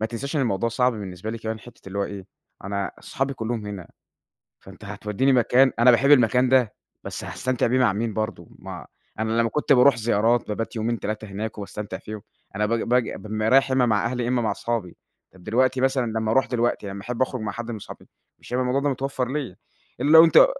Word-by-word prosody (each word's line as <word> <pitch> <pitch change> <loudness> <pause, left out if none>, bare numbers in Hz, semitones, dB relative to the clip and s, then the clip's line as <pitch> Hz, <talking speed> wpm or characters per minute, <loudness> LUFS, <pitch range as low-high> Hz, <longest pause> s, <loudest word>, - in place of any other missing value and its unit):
ما 110 - 0
تنساش 135 +6 -4
إن 145 - +2
الموضوع 115 -1 0
صعب 125 +2 +1
بالنسبة 100 -1 -6
لي 115 - -5
كمان 110 0 -4
حِتّة 120 - -15
اللي 100 +1 -5
هو 100 - +1
إيه، 100 -2 -8 0.4
أنا 100 0 -2
صحابي 135 +1 -3
كلّهم 110 -2 -4
هنا، 100 -4 -7 0.7
فأنت 95 +2 -14
هتودّيني 105 +6 0
مكان، 125 +2 +4
أنا 120 +2 +7
باحب 135 +4 +3
المكان 125 -1 +5
ده 125 -5 +3 0.3
بس - - -6
هاستمتع 130 -1 -1
بيه 125 +2 +2
مع 125 -6 +3
مين 110 +1 -2
برضه، 110 -6 -4
ما - - -9 0.3
أنا 110 0 -1
لمّا 115 - +2
كنت 150 -1 +1
بارُوح 130 -1 +6
زيارات، 115 +1 +1
بابات 115 +3 -4
يومين، 115 +1 -1
3 110 +1 -4
هناك 105 +3 -5
وباستمتع 105 +1 -6
فيهم، 110 -1 -8 0.3
أنا 105 0 +1
ب - - -5
باجي 120 +1 +1
بابقى 110 +1 -3
رايح 135 0 +5
يا - - +2
إما 125 -2 +3
مع 105 -3 +1
أهلي 125 0 -2
يا - - -2
إما 125 -1 +1
مع 110 - 0
أصحابي، 115 -7 -3 0.4
طَب 90 - -17
دلوقتي 130 +3 +1
مثلًا 130 -2 +1
لما 110 -1 -1
أرُوح 135 - +3
دلوقتي، 120 -4 -1
لمّا 100 0 -6
أحب 125 +2 -2
أخرُج 130 -2 -2
مع 105 -2 -3
حد 120 +1 -6
من 110 - -4
صحابي، - - -12 0.3
مش - - -14
هيبقى 130 +1 +1
الموضوع 125 +2 +1
ده 145 - 0
متوفّر 135 -1 -2
ليّا 130 -8 -4 0.4
الّا 145 - +1
لو 160 +1 +10
أنت 170 - +7
115 Hz, 220 wpm, -24 LUFS, 105-130 Hz, 0.7 s, لو